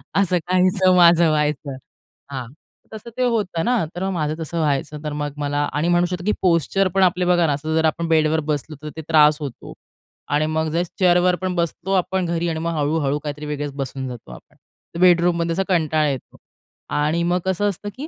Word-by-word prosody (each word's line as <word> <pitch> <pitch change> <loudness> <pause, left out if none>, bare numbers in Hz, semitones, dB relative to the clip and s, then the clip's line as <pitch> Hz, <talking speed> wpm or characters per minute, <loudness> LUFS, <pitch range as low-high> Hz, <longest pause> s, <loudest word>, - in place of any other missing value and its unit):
असं 185 -2 +2
काहीसं 185 0 +3
माझं 170 -2 +6
व्हायचं. 150 -3 -1 0.5
हां, 130 -3 -5 0.5
तसं 220 +2 -9
ते 255 - +1
होतं 210 -9 0
ना, 245 -6 +2
तर 180 - -4
मग 195 - -1
माझं 155 -3 -1
तसं 165 +1 -5
व्हायचं. 150 0 -1
तर 150 - -4
मग 145 -1 -3
मला 145 0 -1
आणि 150 +3 0
म्हणू 175 0 +3
शकतो, 175 0 -4
की 210 - +2
पोश्चर 185 +2 +2
पण 190 - +4
आपले 180 0 +2
बघा 175 -1 +3
ना, 145 - +1
असं 155 +3 -3
जर 160 0 +2
आपण 165 +1 0
बेडवर 160 -1 +2
बसलो 150 +2 -4
तर 150 - -5
ते 160 - -4
त्रास 150 -1 +5
होतो 140 -5 -7 0.6
आणि 150 +1 +2
मग 160 0 -1
जे 170 +2 +1 0.2
चेअरवर 180 0 +4
पण 185 -1 -2
बसतो 170 +2 -2
आपण 190 0 0
घरी 170 0 -1
आणि 160 -1 -3
मग 170 +1 -2
हळू-हळू 145 -1 0
काहीतरी 150 0 -6
वेगळेच 145 -1 -4
बसून 135 -1 -4
जातो 120 - -9
आपण. - - -14 0.4
तर - - -4
बेडरूममध्ये 170 -1 +3
असा 195 +3 0
कंटाळा 155 -4 +2
येतो. 135 -3 -6 0.5
आणि 155 +3 0
मग 175 +1 +1
कसं 190 +2 +1
असतं, 205 +1 -5
की 290 +4 -6
165 Hz, 205 wpm, -21 LUFS, 150-180 Hz, 0.6 s, माझं